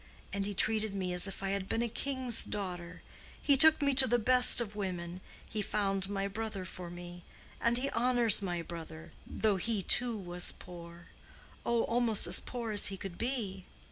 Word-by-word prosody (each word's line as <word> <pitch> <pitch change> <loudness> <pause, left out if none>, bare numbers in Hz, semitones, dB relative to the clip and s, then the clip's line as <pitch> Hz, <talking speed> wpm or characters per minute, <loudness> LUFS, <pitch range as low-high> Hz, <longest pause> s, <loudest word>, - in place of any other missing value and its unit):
And 200 0 -3
he 205 - -6
treated 215 0 +1
me 185 -2 -4
as 180 +2 +5
if 195 - -9
I 195 - -2
had 195 -1 -4
been 230 - -1
a - - -2
king's 260 0 -1
daughter. 180 -4 -7 0.4
He 285 - +2
took 310 +2 +7
me 280 -1 +1
to 260 0 +5
the 240 - +1
best 250 +2 +6
of 215 -3 -3
women. 180 -3 -6 0.3
He 215 - -4
found 195 -1 -3
my 195 -1 -3
brother 210 -2 -6
for 180 0 -10
me. 175 0 -11 0.4
And 235 +1 +1
he 275 +2 -2
honors 240 -3 +3
my 175 -3 -4
brother—though 165 +5 -5
he 210 +1 -3
too 240 +4 +1
was 175 -2 -1
poor—oh, 175 +6 -8
almost 230 -3 +3
as - - +4
poor 235 -3 -7
as 205 -1 +4
he 195 - -2
could 185 -2 -9
be. 215 -7 -4
200 Hz, 180 wpm, -30 LUFS, 180-235 Hz, 0.4 s, took